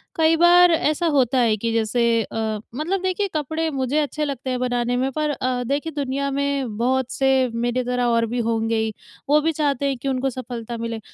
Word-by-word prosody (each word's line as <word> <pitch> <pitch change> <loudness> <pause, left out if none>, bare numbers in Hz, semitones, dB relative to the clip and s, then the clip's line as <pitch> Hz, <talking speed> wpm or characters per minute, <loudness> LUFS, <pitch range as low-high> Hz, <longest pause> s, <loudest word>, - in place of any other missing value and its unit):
कई 320 0 +4
बार 345 +1 +6
ऐसा 315 +1 +1
होता 265 -4 +2
है 230 -3 +3
कि 230 +2 -2
जैसे 230 +1 +1
अ, 220 -1 -3 0.2
मतलब 345 +7 -1
देखिए, 375 +2 -1
कपड़े 315 +2 -1
मुझे 265 +1 -1
अच्छे 300 0 -1
लगते 270 -2 -4
हैं 255 -1 -1
बनाने 245 -1 0
में, 260 +2 0
पर 305 +2 -1
अ, 255 -3 -1
देखिए, 285 +6 -2
दुनिया 280 0 -2
में 275 -5 -2
बहुत 255 +2 0
से 265 -1 +2
मेरी 240 +2 -1
तरह 250 0 -1
और 230 -1 +2
भी 240 +2 -3
होंगे 225 0 0
ही, 220 -1 -1 0.4
वो 300 +1 +5
भी 325 +2 +1
चाहते 285 -3 -1
हैं 275 -2 0
कि 255 - -6
उनको 265 0 0
सफलता 240 -2 -6
मिले। 230 0 -4
260 Hz, 205 wpm, -22 LUFS, 240-295 Hz, 0.4 s, बार